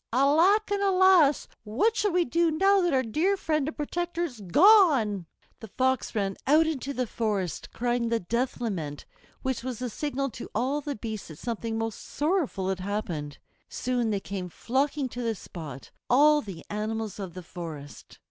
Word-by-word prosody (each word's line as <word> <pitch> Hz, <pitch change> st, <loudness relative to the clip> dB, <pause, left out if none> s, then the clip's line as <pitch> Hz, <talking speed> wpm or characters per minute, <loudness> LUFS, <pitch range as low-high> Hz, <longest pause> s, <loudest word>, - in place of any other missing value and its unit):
Alack 330 Hz, -, +4 dB
and 405 Hz, 0 st, +1 dB
alas! 375 Hz, -6 st, +5 dB, 0.2 s
what 260 Hz, -, +1 dB
shall 415 Hz, -1 st, +1 dB
we 350 Hz, 0 st, +2 dB
do 335 Hz, +6 st, +2 dB
now 390 Hz, +5 st, +3 dB
that 350 Hz, -1 st, +1 dB
our 260 Hz, -2 st, +2 dB
dear 325 Hz, -, +1 dB
friend 310 Hz, -6 st, 0 dB
and 310 Hz, -, -5 dB
protector 345 Hz, +3 st, -2 dB
is 250 Hz, -10 st, -5 dB
gone?" 255 Hz, -, +5 dB, 0.3 s
The 220 Hz, -, -9 dB
Fox 260 Hz, +2 st, 0 dB
ran 195 Hz, -2 st, -1 dB
out 310 Hz, +4 st, +5 dB
into 280 Hz, -3 st, -2 dB
the 255 Hz, -2 st, -1 dB
forest 205 Hz, -7 st, -2 dB
crying 240 Hz, -1 st, -1 dB
the 230 Hz, 0 st, +1 dB
death 235 Hz, +8 st, -2 dB
lament, 165 Hz, -11 st, -4 dB, 0.4 s
which 260 Hz, -2 st, -2 dB
was 255 Hz, -2 st, -4 dB
the 250 Hz, 0 st, -4 dB
signal 275 Hz, 0 st, -2 dB
to 235 Hz, -, -8 dB
all 275 Hz, +4 st, 0 dB
the 285 Hz, 0 st, -4 dB
beasts 215 Hz, -1 st, -6 dB
that 155 Hz, -, -10 dB
something 230 Hz, +1 st, -3 dB
most 225 Hz, -1 st, -3 dB
sorrowful 295 Hz, -, -1 dB
had 190 Hz, -1 st, -2 dB
happened. 185 Hz, -7 st, -4 dB, 0.3 s
Soon 245 Hz, -2 st, -1 dB
they 205 Hz, -2 st, 0 dB
came 190 Hz, -2 st, -5 dB
flocking 275 Hz, -, -1 dB
to 245 Hz, -, -6 dB
the 230 Hz, -2 st, -1 dB
spot, 155 Hz, -8 st, -9 dB, 0.2 s
all 295 Hz, +4 st, +5 dB
the 190 Hz, -, -9 dB
animals 215 Hz, 0 st, -3 dB
of 185 Hz, -3 st, -6 dB
the 185 Hz, -, -7 dB
forest. 160 Hz, -5 st, -9 dB
245 Hz, 175 wpm, -27 LUFS, 205-305 Hz, 0.4 s, alas